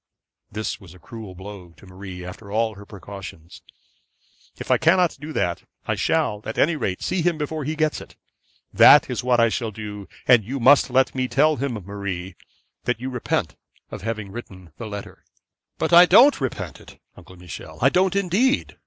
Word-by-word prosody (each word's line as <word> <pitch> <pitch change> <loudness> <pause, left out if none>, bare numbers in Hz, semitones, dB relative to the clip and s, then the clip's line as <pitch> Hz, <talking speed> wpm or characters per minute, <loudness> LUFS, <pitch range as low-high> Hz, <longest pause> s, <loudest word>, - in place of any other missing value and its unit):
This 110 +2 -4
was 90 -2 -14
a - - -14
cruel 110 -2 -10
blow 95 -2 -11
to - - -16
Marie 95 -1 -9
after 100 +3 -10
all 110 +1 0
her 100 0 -13
precautions. 95 -4 -10 1.0
'If - - -5
I - - +4
cannot 175 +1 +3
do 155 +2 -7
that, 85 - -1 0.2
I - - 0
shall 105 0 0
at 110 - -6
any 160 +3 +3
rate 100 -10 -3
see 185 - -1
him 170 -1 +1
before 150 0 -4
he 155 +2 -2
gets 155 -1 0
it. - - -14 0.6
That 145 -2 +7
is 125 0 -3
what 125 -1 +2
I 115 0 +4
shall 115 0 -2
do; 105 -2 -8 0.2
and 120 -3 +6
you 135 +7 -5
must 135 +3 +5
let 130 +1 +2
me 130 -1 -1
tell 145 +5 +2
him, 135 0 -2
Marie, 95 -3 -6 0.5
that - - -1
you 130 +2 -5
repent 125 -2 -2 0.4
having 110 -2 -5
written 95 -6 -10
the 115 - -6
letter.' 100 -1 -8 0.5
'But 160 +1 -1
I 175 +1 +9
don't 265 - +6
repent 130 - -4
it, - - -16 0.2
Uncle 95 - -15
Michel; 85 -3 -10
I - - +4
don't, 185 +1 +2
indeed. 200 +8 +1
115 Hz, 185 wpm, -23 LUFS, 100-150 Hz, 1.0 s, I